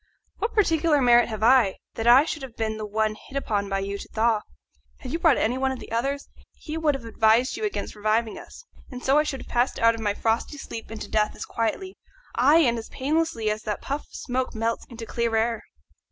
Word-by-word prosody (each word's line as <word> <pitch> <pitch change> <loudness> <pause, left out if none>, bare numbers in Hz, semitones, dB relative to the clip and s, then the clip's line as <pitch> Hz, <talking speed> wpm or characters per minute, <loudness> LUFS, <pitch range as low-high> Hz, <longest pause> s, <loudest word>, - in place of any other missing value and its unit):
What 445 - -2
particular 325 -7 +3
merit 240 -2 +5
have 215 -1 -4
I 235 -5 +5 0.2
that 225 - -3
I 255 +5 +8
should 305 - -4
have 260 -4 -9
been 220 -1 -2
the 215 - -4
one 215 +1 0
hit 270 +5 -9
upon 205 -7 -1
by 195 - 0
you 200 +1 -4
to - - -8
thaw? 220 -1 +1 0.6
Had 255 - -8
you 330 - -1
brought 325 -5 +4
any 245 +4 0
one 265 0 +1
of 260 - -4
the - - -11
others 275 +5 -1
to, - - -25
he 310 - -7
would 315 -3 +1
have 255 -4 -7
advised 225 +2 +3
you 435 - -3
against 410 - -3
reviving 215 +2 0
us, - - -12 0.2
and 250 -1 -8
so 275 +3 +4
I - - +3
should 270 -4 -4
have - - -12
passed 245 +2 +1
out 230 0 +4
of 230 - -7
my 205 -2 0
frosty 230 +6 -1
sleep 225 -4 -8
into 225 -1 -7
death 215 -1 0
as - - -6
quietly, 305 - -3 0.3
ay, 280 +6 +5
and 235 -6 +2
as 225 - -9
painlessly, 275 -6 0
as 215 0 -3
that 210 -2 -4
puff 280 +2 -2
of - - -28
smoke 255 -1 -3
melts 225 +1 -2
into 235 -2 -8
clear 230 +1 -1
air." 225 0 +1
235 Hz, 235 wpm, -25 LUFS, 220-275 Hz, 0.6 s, I